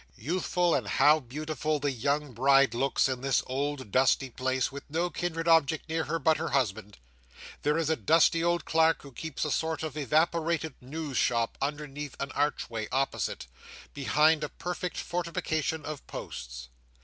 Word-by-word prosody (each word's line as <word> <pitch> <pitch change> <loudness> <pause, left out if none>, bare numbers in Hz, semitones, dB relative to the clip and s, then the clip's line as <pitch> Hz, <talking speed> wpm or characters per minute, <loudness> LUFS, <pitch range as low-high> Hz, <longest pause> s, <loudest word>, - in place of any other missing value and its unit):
Youthful, 175 - 0
and - - 0
how 150 +3 +5
beautiful, 155 +3 -3
the 145 0 0
young 140 +3 -1
bride 135 +1 +4
looks, 135 +3 +2
in 130 -2 -3
this 135 -1 +1
old 135 -3 -3
dusty 130 +1 +3
place, 130 +1 -1
with 140 +1 -7
no 170 +4 -1
kindred 165 -1 -3
object 160 -2 +3
near 160 0 -1
her 165 +2 -1
but 160 +1 +3
her 165 +2 -3
husband. 110 - -1 0.6
There 150 +2 +1
is 165 -2 0
a 160 - +2
dusty 165 +1 +3
old 170 0 +1
clerk, 160 0 +3
who 140 - -11
keeps 155 +4 -4
a 150 - -2
sort 160 +1 -1
of 155 -3 -4
evaporated 160 +2 +1
news 145 +1 -5
shop 115 -1 +1
underneath 145 0 -4
an 140 - -3
archway 120 -6 -1
opposite, 135 - -1 0.5
behind 150 +3 +3
a 150 - -2
perfect 180 +1 -5
fortification 165 -3 -2
of 150 -2 -7
posts. - - -7
150 Hz, 160 wpm, -29 LUFS, 135-160 Hz, 0.6 s, how